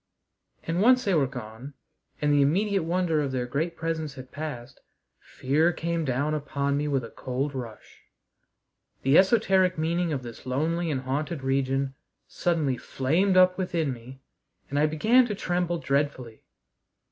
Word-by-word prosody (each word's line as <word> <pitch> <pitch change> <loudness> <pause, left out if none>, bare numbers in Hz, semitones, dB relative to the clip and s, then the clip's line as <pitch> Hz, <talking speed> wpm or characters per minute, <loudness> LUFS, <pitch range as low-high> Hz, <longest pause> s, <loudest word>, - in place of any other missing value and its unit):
And, 165 +3 -1
once 250 +3 +5
they 195 - +2
were 145 -5 +3
gone 125 +2 -9 0.4
and 145 -1 +2
the 145 - +4
immediate 195 +7 +2
wonder 165 -1 0
of 140 -2 -2
their 125 -1 -2
great 155 +7 -2
presence 160 -3 -3
had 130 0 -10
passed, 145 -6 -7 0.4
fear 155 +6 +1
came 170 -1 -2
down 140 +3 0
upon 140 -1 -1
me 145 +1 -1
with 135 -3 0
a 115 - -9
cold 135 +3 -3
rush. 120 -5 -9 1.0
The 135 +2 +3
esoteric 190 -3 +3
meaning 170 +2 0
of 135 -4 -3
this 120 +1 -10
lonely 165 +6 0
and 135 -4 -1
haunted 140 +3 -3
region 135 0 0 0.3
suddenly 155 -7 0
flamed 175 +12 +1
up 185 0 +5
within 170 -6 -1
me 125 +3 -12 0.5
and 145 - 0
I 150 - +4
began 225 +12 +4
to 210 - -3
tremble 175 -2 -1
dreadfully. 140 -6 -2
150 Hz, 155 wpm, -26 LUFS, 135-175 Hz, 1.0 s, once